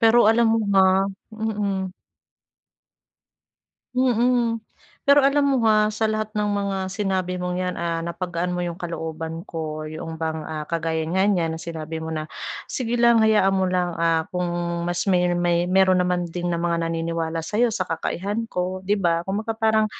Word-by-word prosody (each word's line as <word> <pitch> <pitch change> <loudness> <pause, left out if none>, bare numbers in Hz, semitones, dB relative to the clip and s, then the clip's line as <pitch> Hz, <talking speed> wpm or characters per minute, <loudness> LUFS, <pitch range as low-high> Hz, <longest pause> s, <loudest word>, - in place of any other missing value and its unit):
Pero 225 0 +6
alam 230 0 +4
mo 225 - +3
ba? 190 0 +4 0.3
Mm. 205 -4 -2 2.0
Mm. 245 -2 +2 0.5
Pero 280 0 +7
alam 280 +1 +3
mo 265 -4 +2
ha, 215 0 +4
sa 220 0 +1
lahat 215 0 -3
ng 210 0 0
mga 200 -1 -1
sinabi 190 -3 -1
mong 180 0 -2
'yan, 180 0 -2
ah, 165 -1 -1
napagaan 170 +1 -3
mo 180 - -2
'yong 175 -1 -2
kalooban 165 -1 -5
ko 155 -2 -5
'yong 160 +1 -6
bang, 160 -1 -2
ah, 155 -1 -5
kagaya 165 -1 -1
nga 185 +3 +1
niyan 165 -4 0
na 160 - -7
sinabi 160 -1 -5
mo 160 - -4
na, 155 -1 -3 0.4
"sige 240 -1 -2
lang 235 -1 +5
hayaan 210 -3 +4
mo 190 -1 +1
lang, 180 -1 0
ah, 165 -1 +1
kung 180 -1 0 0.3
mas 175 +2 -2
may 180 -2 +3
may 175 0 +1
mayro'n 185 -1 +4
naman 180 -1 0
din 175 +1 -3
ng 170 - 0
mga 170 -1 0
naniniwala 165 0 -2
sa'yo 215 +8 +1
sa 190 -4 -2
kakayahan 205 +7 -3
ko" 185 +1 -2
'di 205 +2 +1
ba, 170 -3 +1
kumbaga 215 +5 -2
parang 220 -1 +2
180 Hz, 170 wpm, -23 LUFS, 165-215 Hz, 2.0 s, Pero